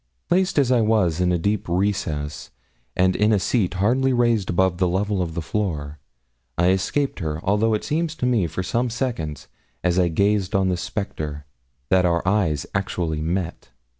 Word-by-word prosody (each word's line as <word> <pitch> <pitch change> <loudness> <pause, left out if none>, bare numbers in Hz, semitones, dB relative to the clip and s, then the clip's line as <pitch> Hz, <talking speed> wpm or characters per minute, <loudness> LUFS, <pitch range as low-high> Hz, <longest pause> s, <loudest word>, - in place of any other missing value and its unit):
Placed 190 +1 +2
as 135 -3 +3
I 125 -2 +4
was 100 -7 +2
in 90 0 +2
a 90 - +2
deep 100 +2 -1
recess, 85 -6 -2 0.5
and 95 0 +3
in 105 +1 +3
a 105 - +4
seat 95 -2 0
hardly 125 +8 +2
raised 120 -5 +2
above 90 0 +1
the 90 - +3
level 95 +2 0
of 80 -2 -3
the 85 - -3
floor, 75 -8 -3 0.6
I 85 +1 +3
escaped 115 +9 0
her, 80 -3 -3
although 105 +3 +2
it 105 - -3
seemed 160 +3 0
to 155 -5 -4
me 115 -8 +2
for 85 +4 -4
some 120 +6 0
seconds, 115 - -3 0.4
as 90 0 +2
I 90 - +4
gazed 100 +3 +1
on 95 -1 +2
this 90 -1 -1
spectre, 75 -7 -4 0.4
that 95 -1 +4
our 85 +1 0
eyes 90 -8 +1
actually 85 -5 -2
met. 85 +1 -3
95 Hz, 180 wpm, -23 LUFS, 85-110 Hz, 0.6 s, I